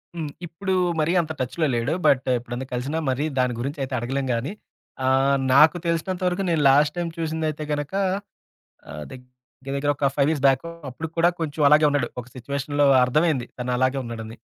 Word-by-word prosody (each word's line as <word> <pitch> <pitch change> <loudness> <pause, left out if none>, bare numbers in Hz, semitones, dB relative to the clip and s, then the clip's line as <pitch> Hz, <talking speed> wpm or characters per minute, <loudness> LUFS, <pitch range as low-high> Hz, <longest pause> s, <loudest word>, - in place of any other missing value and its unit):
హ్మ్. 160 -3 -4 0.2
ఇప్పుడు 190 +4 -3 0.3
మరీ 155 +3 +1
అంత 160 -1 -6
టచ్‌లో 130 +6 -1
లేడు. 120 +6 0
బట్ 130 -1 +3
ఎప్పుడైనా 120 +2 -6
కలిసినా 135 +6 -2
మరి 130 +2 0 0.2
దాని 125 -1 +2
గురించైతే 135 +1 -4
అడగలేం 135 +3 -2
గాని, 120 +7 -2 0.5
ఆహ్, 135 +1 +3 0.2
నాకు 150 +5 +6
తెలిసినంత 170 +2 -1
వరకు 180 +2 -1
నేను 165 -3 +1
లాస్ట్ 145 +3 +4
టైమ్ 170 -1 -2
చూసిందయితే 155 -1 -2
గనక, 145 +3 -4 1.0
ఆహ్, 75 0 -7
దగ్గర 125 -1 -11 0.5
దగ్గర 145 +1 0
ఒక 140 0 +2
5 140 -1 +3
ఇయర్స్ 150 -4 -1
బ్యాక్ 135 -1 +4 0.3
అప్పుడు 160 +6 -6
కూడా 170 +1 +4
కొంచెం 155 -1 -2
అలాగే 150 +1 +5
ఉన్నాడు. 145 -4 0
ఒక 120 - -12
సిట్యుయేషన్‌లో 140 +3 -1 0.2
అర్థమైంది 145 -1 +1
తనలాగే 125 +2 0
ఉన్నాడని. 115 -1 -7
140 Hz, 165 wpm, -23 LUFS, 130-160 Hz, 1.0 s, నాకు